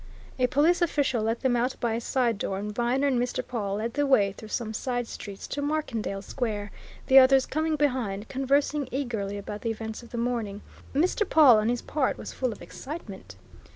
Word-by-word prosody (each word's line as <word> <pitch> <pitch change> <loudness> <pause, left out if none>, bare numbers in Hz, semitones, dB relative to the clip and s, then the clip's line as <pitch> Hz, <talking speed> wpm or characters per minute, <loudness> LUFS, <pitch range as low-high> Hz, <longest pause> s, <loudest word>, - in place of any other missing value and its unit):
A 250 - +4
police 305 +7 +3
official 285 -8 +1
let 225 +2 -1
them 255 -2 +2
out 245 +2 0
by 235 -2 0
a 230 - -2
side 240 -4 0
door, 195 - -2
and 210 +1 -4
Viner 245 +5 +1
and 265 -4 +2
Mr. 245 - -2
Pawle 205 -5 -2
led 225 +3 -3
the 290 0 +1
way 205 -7 +4
through 215 +3 -11
some 220 0 -3
side 245 +1 -2
streets 200 -3 -8
to 285 - -3
Markendale 260 -10 -2
Square, 210 -4 -3 0.3
the 265 0 +8
others 265 0 +6
coming 315 +1 0
behind, 250 -8 -1
conversing 275 +1 +1
eagerly 225 -7 -2
about 205 +1 -6
the 230 - -2
events 220 0 -5
of 235 - -14
the 240 - -6
morning. 230 -4 -2 0.3
Mr. 360 +8 +2
Pawle, 300 - +7
on 215 +2 +1
his 245 0 -1
part, 290 -4 0
was - - -7
full 255 -2 -1
of - - -9
excitement. 205 - -8
245 Hz, 200 wpm, -27 LUFS, 215-275 Hz, 0.3 s, the